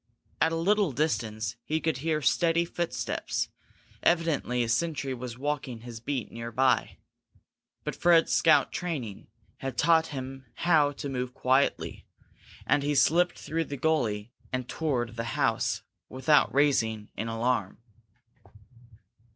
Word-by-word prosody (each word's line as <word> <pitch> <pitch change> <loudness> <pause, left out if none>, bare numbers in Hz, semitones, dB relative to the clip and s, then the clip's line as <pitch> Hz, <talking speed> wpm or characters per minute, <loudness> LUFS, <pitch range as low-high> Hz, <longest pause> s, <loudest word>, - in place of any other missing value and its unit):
At 160 - +4
a - - -1
little 195 +1 +2
distance 110 -5 -1
he 155 +4 -1
could 160 -3 -1
hear 155 +1 -1
steady 170 +2 +3
footsteps; 170 0 -2 0.5
evidently 160 -8 +1
a - - -2
sentry 140 +3 0
was 125 -1 -6
walking 135 -4 -3
his 120 -1 -8
beat 130 0 -3
near 115 0 -6
by. 125 - +2 0.9
But - - -3
Fred's 170 -1 +4
scout 160 -2 +4
training 140 - -4 0.3
had 135 -3 -5
taught 165 -1 +4
him 135 -2 -7
how 155 -4 +3
to 140 +1 -6
move 125 -2 -3
quietly 130 +2 +1 0.6
and 145 - +3
he 145 +1 0
slipped 175 +6 +3
through 165 +1 -2
the 140 - -6
gully 120 -9 0 0.2
and 130 -1 -2
toward 125 -7 -2
the 115 - -1
house - - +1 0.3
without 130 +4 +3
raising 115 -7 +1
an 110 - -3
alarm. 115 -3 -1
135 Hz, 135 wpm, -28 LUFS, 120-160 Hz, 0.9 s, At